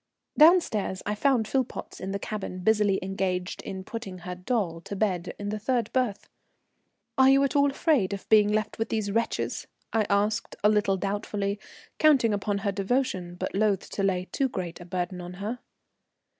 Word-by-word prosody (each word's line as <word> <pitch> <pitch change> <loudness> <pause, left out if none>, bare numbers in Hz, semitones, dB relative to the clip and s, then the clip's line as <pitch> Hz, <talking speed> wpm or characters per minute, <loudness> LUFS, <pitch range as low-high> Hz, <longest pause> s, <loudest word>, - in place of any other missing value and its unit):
Down 330 +4 +8
stairs 200 - -3
I 210 - 0
found 235 0 +2
Philpotts 260 +1 -2
in 190 - -4
the 200 - -1
cabin, 200 -3 -5
busily 210 -1 +3
engaged 185 -1 -2
in 190 -1 -6
putting 195 -3 -6
her 180 - -4
"doll" 180 -3 -2
to 200 - -6
bed 185 -4 -1
in 205 0 -4
the 215 +1 -3
third 235 0 -1
berth. 250 -6 0 0.9
"Are 265 0 +7
you 275 +1 +5
at 275 - 0
all 285 0 +5
afraid 275 - +2
of 200 -1 -5
being 210 -1 +5
left 215 +1 -1
with 225 - -1
these 215 -2 -1
wretches?" 230 +2 -1 0.3
I 220 -2 +2
asked 210 +2 +1
a 210 - +6
little 205 -2 +2
doubtfully, 200 +1 -2 0.4
counting 275 -8 +5
upon 200 0 -1
her 200 - +2
devotion, 195 -4 -1
but - - -4
loth 200 -1 +1
to - - -3
lay 185 -2 +1
too 270 -1 +1
great 175 -6 -5
a - - -9
burden 180 0 -3
on 175 0 -7
her. 210 +7 -4
205 Hz, 185 wpm, -27 LUFS, 190-230 Hz, 0.9 s, Down